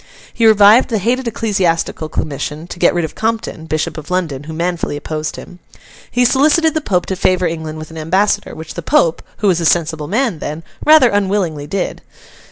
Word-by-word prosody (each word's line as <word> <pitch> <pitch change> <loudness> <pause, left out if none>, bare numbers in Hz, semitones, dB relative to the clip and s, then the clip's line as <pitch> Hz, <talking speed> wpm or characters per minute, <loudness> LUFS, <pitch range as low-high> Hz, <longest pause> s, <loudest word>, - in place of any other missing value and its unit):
He 230 - +3
revived 215 +4 +6
the 225 - 0
hated 240 +5 0
Ecclesiastical 185 -8 -1
Commission, 150 +1 -4
to 175 - -8
get - - +3
rid 175 -2 +1
of 160 - -8
Compton, 220 -7 -3
Bishop 155 0 -2
of 155 - -11
London, 160 -7 -2
who 160 - -7
manfully 170 -2 -2
opposed 155 +1 -4
him. 180 - -11 0.5
He 245 0 +2
solicited 300 +5 +3
the 315 - -1
Pope 180 -10 0
to 190 - -3
favour 185 0 +1
England 160 -2 -4
with 155 0 -9
an 160 - -8
ambassador, 195 +6 0
which 160 0 -8
the 170 - -5
Pope 165 +1 +2 0.2
(who 210 - 0
was 175 -3 +2
a - - -1
sensible 160 -3 0
man 220 - 0
then) 155 +3 -5 0.2
rather 305 -5 +6
unwillingly 190 -7 -1
did. 195 +6 -3
180 Hz, 190 wpm, -16 LUFS, 160-215 Hz, 0.5 s, revived